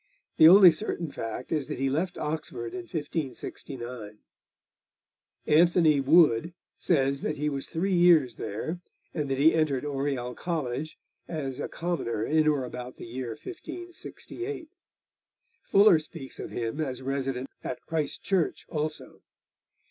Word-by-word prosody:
The 155 - +9
only 185 0 +10
certain 165 -2 -4
fact 115 +2 -6
is 155 -4 0
that - - -4
he 135 +2 0
left 165 +7 -1
Oxford 150 -7 -4
in 180 -2 -6
1569. 130 -7 -5 1.3
Anthony 160 -2 +4
à - - -4
Wood 160 0 +4 0.2
says 140 -4 +1
that 150 - -2
he 150 +1 0
was 140 -2 -4
three 185 +4 -1
years 170 -9 +5
there, 155 - -4 0.3
and 150 -4 -2
that 135 - 0
he 150 +4 +5
entered 150 -4 +1
Oriel 135 -3 -2
College 155 -2 -3 0.3
as 140 -5 -4
a - - -2
commoner 160 -11 -2
in 155 0 +2
or 145 -3 +2
about 125 0 -7
the - - -9
year 120 0 -5
1568. 355 0 -7 0.9
Fuller 200 -4 +5
speaks 155 -3 -8
of - - -5
him 115 +4 -3
as 130 -3 -3
resident 135 -1 -2 0.2
at 125 - -4
Christ 155 -3 -2
Church 190 -4 0
also. 155 -1 -4
150 Hz, 140 wpm, -28 LUFS, 130-170 Hz, 1.3 s, only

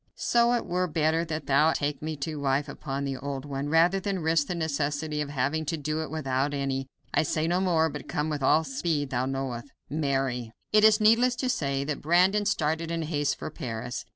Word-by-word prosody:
So 235 0 +3
it 240 - 0
were 180 +1 0
better 160 0 +1
that 155 -3 -4
thou 150 +4 +4
take 145 -1 -2
me 155 0 -3
to 155 -2 -5
wife 140 +1 0
upon 140 0 -4
the 135 -1 -3
old 135 +1 -5
one, 140 0 -3
rather 170 +5 +4
than 195 -3 -2
risk 160 -2 +2
the 180 - -2
necessity 150 -1 -1
of 145 - -3
having 145 +3 -1
to 160 +2 -2
do 155 +1 -2
it 160 - -5
without 140 -2 -1
any. 135 -1 -2 0.3
I - - +4
say 155 0 0
no 175 +2 +1
more, 165 -4 +3
but 150 -1 -7
come 150 +1 -1
with 150 -2 -3
all 155 +4 +4
the 150 - -8
speed 145 0 -1
thou 125 0 0
knowest. 135 -2 -3 0.2
"MARY." 135 -6 -1 0.2
It 215 0 +6
is 215 0 +6
needless 230 +4 +4
to 255 +1 -2
say 140 - 0
that 145 0 -3
Brandon 185 +6 +3
started 160 -2 0
in 165 -1 -2
haste 145 -2 0
for - - -6
Paris. 120 0 -5
150 Hz, 215 wpm, -27 LUFS, 140-165 Hz, 0.3 s, It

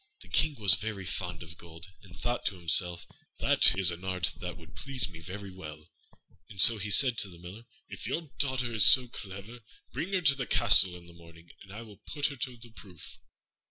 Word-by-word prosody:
The - - -16
King 155 -2 0
was 100 -4 +5
very 100 0 -2
fond 90 -2 -6
of 85 0 -14
gold, 85 +2 -14
and 90 -4 -17
thought 120 0 -4
to 100 - -3
himself, 85 0 +1 0.3
"That - - +3
is 95 -3 +5
an 85 +2 -10
art 90 -3 -2
which 90 -1 -8
would 80 -2 -17
please 130 - -1
me 85 -5 -14
very 95 +4 -10
well"; 75 -4 -13 0.6
and 95 - -12
so 110 +3 +6
he 105 +2 -5
said 125 +2 +5
to 100 - -2
the 85 - -15
Miller, 90 +7 -13 0.2
"If - - -10
your 160 -4 -6
daughter 130 -3 -1
is 110 -3 +5
so 130 - +9
very 125 - -15
clever, 100 +4 -11 0.3
bring 180 - -6
her 185 - 0
to 140 -5 +4
the 135 -2 -6
castle 95 -6 +3
in 85 -1 -14
the 85 - -17
morning, 85 0 -18
and 95 - -16
I 110 +4 -10
will 105 -3 -16
put 145 -1 -5
her 140 - -9
to 125 -1 -6
the 115 0 -15
proof." 95 -6 -14
95 Hz, 225 wpm, -28 LUFS, 85-120 Hz, 0.6 s, so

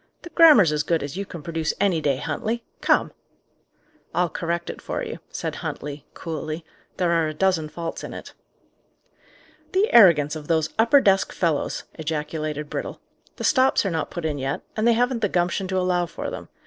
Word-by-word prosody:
"The 345 - -10
grammar's 295 - +7
as 150 -1 +1
good 165 0 0
as 140 +2 -6
you 200 +1 -4
can 170 -4 -9
produce 165 -1 -2
any 190 -5 +2
day, 140 -3 +1
Huntley. 230 - -3 0.2
Come!" - - +2 1.0
"I'll 175 0 +2
correct 170 0 -2
it - - -12
for - - -4
you," - - -6
said - - -4
Huntley, 145 0 -6
coolly. 160 0 -5 0.3
"There 175 -2 +1
are 165 -2 +2
a 155 - -5
dozen 175 -3 +1
faults 165 +1 -5
in - - -6
it." - - -9 1.4
"The 390 +4 +2
arrogance 165 -9 +6
of 150 -1 -8
those 160 -2 +1
upper 235 +5 +6
desk 195 -3 +3
fellows!" 165 -5 -1
ejaculated 155 -1 -3
Brittle. - - -5 0.4
"The - - -7
stops 260 -5 +3
are 195 - 0
not 160 -1 -2
put 175 -2 -5
in 150 -2 -1
yet, 135 +2 -2
and 220 +1 +1
they 235 - +6
haven't 245 +1 +1
the 205 - +1
gumption 180 +2 0
to 190 0 -1
allow 180 -1 +1
for - - -6
them. - - -8
170 Hz, 185 wpm, -24 LUFS, 155-195 Hz, 1.4 s, grammar's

